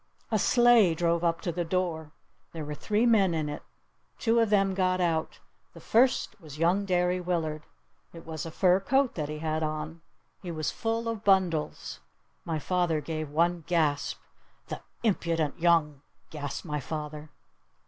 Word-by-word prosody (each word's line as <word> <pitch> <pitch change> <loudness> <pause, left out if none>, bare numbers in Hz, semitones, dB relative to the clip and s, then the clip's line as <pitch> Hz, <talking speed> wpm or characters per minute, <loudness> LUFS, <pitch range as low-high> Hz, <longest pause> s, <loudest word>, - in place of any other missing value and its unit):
A 215 - +2
sleigh 240 -7 +5
drove 170 +1 +1
up 165 -1 +1
to 175 - -2
the 175 +1 -2
door. 165 -3 -2 0.4
There 160 -2 -5
were 150 - -5
three 210 +9 0
men 200 -7 +4
in 155 -2 -1
it. 145 - -5 0.6
Two 230 0 +2
of 225 -2 +3
them 195 -2 +3
got 185 -1 +1
out. 165 -3 -1 0.4
The - - -10
first 250 +1 +2
one - - -24
was 150 -2 -10
young 175 +5 +2
Derry 180 -1 +1
Willard. 160 -4 -2 0.4
It 165 -1 -12
was 160 -1 -5
a 165 - -5
fur 180 +2 +3
coat 265 +6 +1
that 150 -3 -4
he 150 - -4
had 155 0 -2
on. 155 +1 -4 0.4
He 180 - -7
was 155 -3 -2
full 225 0 -2
of 225 -2 -3
bundles. 185 -6 +1 0.5
My 160 - -2
father 175 0 0
gave 155 0 -4
one 170 +3 +1
gasp. 155 -5 0 0.5
"The - - -3 0.2
the 230 - +1
impudent 165 -5 -1
young 165 -4 +2
" - - -42
gasped 145 0 -5
my 150 -2 -2
father. 150 +1 -6
170 Hz, 175 wpm, -28 LUFS, 155-190 Hz, 0.6 s, sleigh